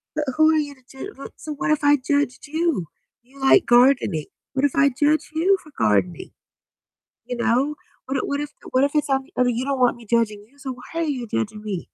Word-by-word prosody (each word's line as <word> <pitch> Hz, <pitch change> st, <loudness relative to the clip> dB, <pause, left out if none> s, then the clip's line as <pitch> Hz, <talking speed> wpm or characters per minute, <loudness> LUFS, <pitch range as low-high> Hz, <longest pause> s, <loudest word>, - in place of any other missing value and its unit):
but 305 Hz, -1 st, -1 dB
who 315 Hz, 0 st, +5 dB
are 320 Hz, -, +3 dB
you 290 Hz, -2 st, -2 dB
to 260 Hz, -, -24 dB
jud 330 Hz, +10 st, -9 dB
what 275 Hz, -, -9 dB
so, 310 Hz, -, -6 dB
what 295 Hz, -, -1 dB
if 305 Hz, -, +1 dB
I 290 Hz, 0 st, +5 dB
judged 285 Hz, -1 st, -1 dB
you? 315 Hz, -, 0 dB, 0.4 s
You 270 Hz, +3 st, -19 dB
like 270 Hz, +7 st, +5 dB
gardening. 240 Hz, -, +4 dB, 0.3 s
What 270 Hz, 0 st, +1 dB
if 285 Hz, -, +2 dB
I 280 Hz, 0 st, +5 dB
judge 295 Hz, +4 st, +1 dB
you 365 Hz, +5 st, +3 dB
for 305 Hz, -, -16 dB
gardening, 100 Hz, -5 st, +1 dB, 0.9 s
you 245 Hz, +1 st, -4 dB
know? 255 Hz, +5 st, +1 dB, 0.3 s
What 270 Hz, 0 st, -2 dB
what 280 Hz, -, -1 dB
if 295 Hz, 0 st, -4 dB, 0.2 s
what 260 Hz, +1 st, +3 dB
if 280 Hz, -, +2 dB
it's 300 Hz, -1 st, +1 dB
on 270 Hz, 0 st, +1 dB
the -, -, -23 dB
other 250 Hz, 0 st, +4 dB
you 245 Hz, +2 st, -1 dB
don't 275 Hz, -1 st, -1 dB
want 245 Hz, -1 st, +3 dB
me 235 Hz, -, -14 dB
judging 215 Hz, -3 st, +1 dB
you, 280 Hz, -, -27 dB
so 280 Hz, -2 st, -5 dB
why 290 Hz, +7 st, -6 dB
are -, -, +1 dB
you 270 Hz, -6 st, -3 dB
judging 215 Hz, 0 st, -3 dB
me? 205 Hz, -4 st, -3 dB
270 Hz, 230 wpm, -23 LUFS, 240-295 Hz, 0.9 s, who